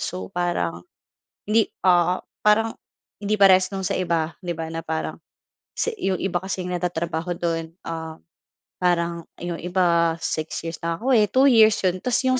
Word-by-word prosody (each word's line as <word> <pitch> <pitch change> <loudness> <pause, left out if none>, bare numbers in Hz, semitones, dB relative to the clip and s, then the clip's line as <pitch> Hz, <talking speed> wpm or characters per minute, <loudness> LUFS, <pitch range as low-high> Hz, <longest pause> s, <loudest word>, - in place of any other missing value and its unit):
So, 95 0 -5
parang 170 - -1 0.6
hindi, 215 +1 +2 0.2
ah, 180 0 +3 0.2
parang 220 +1 +3 0.5
hindi 210 +1 0
parehas 190 -2 +6
nung 195 -1 -5
sa 195 - 0
iba, 170 -3 0
'di 175 -2 -4
ba 160 0 -5
na 165 - -3
parang 160 -1 -4 0.6
sa 470 - 0
'yung 190 -2 +1
iba 180 -2 -1
kasi, 190 -1 -4
nagtatrabaho 175 -1 -2
do'n, 165 0 -3
ah, 160 -1 -5 0.6
parang 170 -2 0
'yung 175 -1 -5
iba, 170 -2 +2
6 155 +1 -3
years 165 -1 -5
nakakauwi, 210 +7 +2
2 265 +4 +4
years 220 -2 +6
'yon 185 0 +1
tapos 250 +4 0
'yung 255 0 +2
175 Hz, 155 wpm, -23 LUFS, 165-195 Hz, 0.6 s, parehas